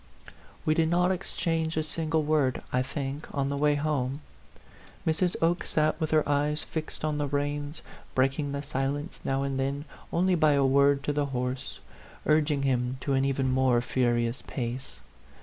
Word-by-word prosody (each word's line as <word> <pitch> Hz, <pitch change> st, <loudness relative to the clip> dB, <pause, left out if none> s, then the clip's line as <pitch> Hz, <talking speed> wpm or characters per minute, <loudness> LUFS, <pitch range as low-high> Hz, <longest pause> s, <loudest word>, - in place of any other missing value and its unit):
We 155 Hz, -, +4 dB
did 160 Hz, 0 st, +2 dB
not 180 Hz, +2 st, +3 dB
exchange 165 Hz, -3 st, -1 dB
a 155 Hz, -, +2 dB
single 160 Hz, 0 st, 0 dB
word, 145 Hz, -4 st, +1 dB
I 125 Hz, -, +3 dB
think, 140 Hz, +2 st, -4 dB
on 140 Hz, -1 st, 0 dB
the 140 Hz, -, -1 dB
way 145 Hz, +1 st, +3 dB
home. 145 Hz, -2 st, -1 dB, 0.8 s
Mrs. 170 Hz, +3 st, +1 dB
Oke 170 Hz, +2 st, +2 dB
sat 155 Hz, +1 st, +1 dB
with 155 Hz, -, 0 dB
her 155 Hz, -1 st, +3 dB
eyes 145 Hz, +1 st, +1 dB
fixed 155 Hz, -1 st, -4 dB
on 150 Hz, -1 st, -1 dB
the 145 Hz, -, 0 dB
reins, 145 Hz, +1 st, -2 dB, 0.3 s
breaking 135 Hz, +2 st, +1 dB
the 140 Hz, 0 st, -3 dB
silence 140 Hz, +2 st, -2 dB
now 135 Hz, 0 st, 0 dB
and 135 Hz, -1 st, -2 dB
then 140 Hz, +2 st, -1 dB, 0.3 s
only 185 Hz, +2 st, +2 dB
by 155 Hz, -4 st, +4 dB
a 140 Hz, -1 st, +3 dB
word 140 Hz, +1 st, +4 dB
to 145 Hz, -, 0 dB
the 145 Hz, -1 st, 0 dB
horse, 125 Hz, -1 st, -3 dB, 0.5 s
urging 150 Hz, -2 st, +2 dB
him 125 Hz, -1 st, 0 dB
to 140 Hz, -, -1 dB
an 135 Hz, 0 st, +3 dB
even 135 Hz, -1 st, +1 dB
more 130 Hz, -2 st, +3 dB
fu 125 Hz, +2 st, -4 dB
rious 120 Hz, 0 st, +1 dB
pace. 125 Hz, 0 st, -5 dB
145 Hz, 175 wpm, -28 LUFS, 135-155 Hz, 0.8 s, We